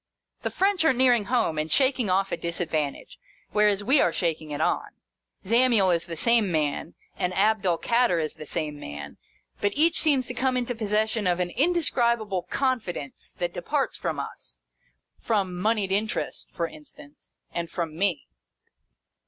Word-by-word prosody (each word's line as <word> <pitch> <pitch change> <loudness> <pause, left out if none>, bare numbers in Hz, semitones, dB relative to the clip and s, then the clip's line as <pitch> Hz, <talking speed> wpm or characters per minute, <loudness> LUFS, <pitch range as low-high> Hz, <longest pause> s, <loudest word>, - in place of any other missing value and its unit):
The - - -2
French 385 -2 +1
are 320 - +4
nearing 245 -4 +3
home, 225 -9 +1
and 155 +1 -2
shaking 260 -5 +2
off 195 +1 +1
a - - +1
disadvantage, 160 -4 -3 0.3
whereas 210 -1 +2
we 270 +7 +4
are 175 - +3
shaking 160 -3 -2
it 145 - -4
on. - - 0 0.6
Zamiel 230 -3 +4
is 170 0 0
the 165 -1 -6
same 230 -1 +3
man, 155 0 -1 0.2
and 180 0 -1
Abd 210 0 +2
el 170 -2 +2
Kader 235 -5 +2
is 155 -2 -2
the 155 -1 -10
same 150 0 -3
man, 75 - -8 0.4
but 205 +5 -1
each 325 +3 +4
seems 280 -5 +3
to 250 - -6
come 255 0 0
into 245 0 -1
possession 220 -1 0
of 175 0 +1
an 175 -1 -1
in 290 - +2
describable 235 - +1
confidence 220 - -3
that 175 -1 -2
departs 275 - -1
from - - -3
us - - -8 0.3
— - - -48
from 200 -5 0
Mouied 205 +1 0
Interest, 210 +3 -2
for 170 - -2
instance, 150 -2 -14 0.2
and 170 -1 -3
from 165 -3 -4
me. 175 -4 -1
200 Hz, 170 wpm, -26 LUFS, 170-240 Hz, 0.6 s, are